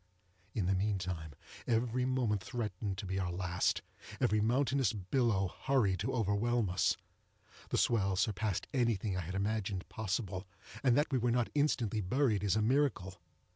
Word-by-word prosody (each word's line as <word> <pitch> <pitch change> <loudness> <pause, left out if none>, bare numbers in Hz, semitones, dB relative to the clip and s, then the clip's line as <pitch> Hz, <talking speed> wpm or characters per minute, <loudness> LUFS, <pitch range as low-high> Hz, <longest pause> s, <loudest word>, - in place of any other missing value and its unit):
In 105 - 0
the 95 - +2
meantime 90 -5 -2 0.3
every 120 +2 +1
moment 125 -6 +1
threatened 105 -4 -3
to 100 - -5
be 95 +1 -2
our 90 -2 -1
last—every 90 +3 -1
mountainous 130 +1 +2
billow 100 -2 0
hurried 110 -9 +2
to 120 +6 -1
overwhelm 110 -1 +1
us. 90 - +2 0.7
The - - 0
swell 100 -5 +2
surpassed 100 0 0
anything 115 -6 +1
I 95 - -1
had 90 +3 -5
imagined 100 -1 -1
possible, 100 -2 -3 0.3
and 125 -3 +4
that 150 +1 +2
we 130 - +2
were 120 +1 +1
not 120 0 +1
instantly 125 -8 +1
buried 110 0 +1
is 100 -1 +2
a 110 - +2
miracle. 110 -8 +1
105 Hz, 150 wpm, -33 LUFS, 95-120 Hz, 0.7 s, and